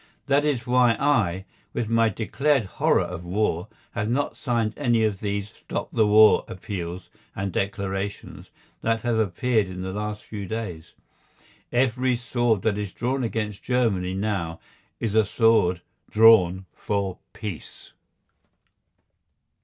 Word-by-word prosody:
That 140 +1 +3
is 130 -5 0
why 125 -2 +4
I, 100 -10 +1 0.3
with 120 -2 -2
my 115 0 +3
declared 135 +5 0
horror - - +2
of 90 -1 -6
war, 90 -1 -1 0.2
have 105 +1 -2
not 135 +4 0
signed 115 -4 -1
any 120 -5 +2
of 105 -3 0
these 100 0 -3
"stop - - -5
the 110 -2 +3
war" 110 +1 +6
appeals 90 -2 -6 0.2
and 100 0 -3
declarations 100 0 -4 0.3
that 115 -1 0
have 115 -1 0
appeared 110 +2 +1
in 90 0 -6
the 95 0 -4
last 105 +1 -4
few 100 -3 -7
days. 90 -7 -5 0.8
Every 125 0 +2
sword 120 -3 0
that 105 -2 +1
is 100 -2 -4
drawn 130 +2 -1
against 110 -3 -3
Germany 100 -8 0
now 95 -5 -2 0.4
is 110 -3 -2
a 110 0 +5
sword 100 -5 +3 0.3
drawn 95 -5 +5
for 100 -3 -2
peace. 105 -7 -8
105 Hz, 135 wpm, -25 LUFS, 95-115 Hz, 0.8 s, war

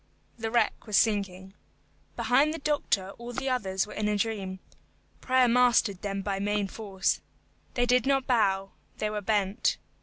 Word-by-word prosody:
The 225 0 -2
wreck 230 0 0
was 210 - +2
sinking. 195 -3 0 0.6
Behind 280 +5 +3
the 325 - -4
doctor 280 -11 0
all 240 +1 -7
the 270 +3 -2
others 190 -6 0
were 210 - -10
in 215 - -1
a 210 0 +1
dream. 200 -3 -2 0.6
Prayer 255 -1 +3
mastered 240 -5 +3
them 195 -1 -3
by 195 -1 -2
main 205 0 0
force. 195 -2 -2 0.5
They 245 - +2
did 250 +2 +3
not 270 -1 +2
bow, 195 -6 +1 0.3
they 210 0 -1
were 210 -1 -3
bent. 205 0 +1
210 Hz, 160 wpm, -28 LUFS, 195-245 Hz, 0.6 s, Behind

